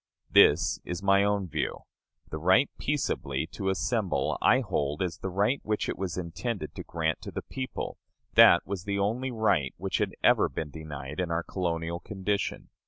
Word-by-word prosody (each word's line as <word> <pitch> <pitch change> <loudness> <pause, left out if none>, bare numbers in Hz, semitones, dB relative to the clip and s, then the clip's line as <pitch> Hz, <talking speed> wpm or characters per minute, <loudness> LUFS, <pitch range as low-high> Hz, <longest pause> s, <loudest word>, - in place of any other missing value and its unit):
This - - +5
is 90 +2 -5
my 100 0 +5
own 100 -2 +1
view. 80 - -3 0.5
The 80 - -4
right 95 - +4
peaceably 80 - -1
to 95 -1 -2
assemble, 100 +1 0
I 130 - +5
hold 75 - -1
as 85 -3 -4
the 95 - -3
right 100 +9 +1
which 105 -1 -1
it - - -2
was 95 -2 -4
intended 90 +5 -4
to - - -7
grant 80 -2 -2
to - - -7
the - - -5
people; 130 -1 -5 0.3
that 85 - +7
was 95 -2 -5
the 100 0 -1
only 115 +7 0
right 100 - +1
which - - -2
had - - -1
ever - - +5
been 75 -2 -5
denied 75 -2 -7
in 90 -2 -1
our 85 0 -1
colonial 85 -2 -2
condition. 100 +1 -3
95 Hz, 175 wpm, -28 LUFS, 80-105 Hz, 0.5 s, that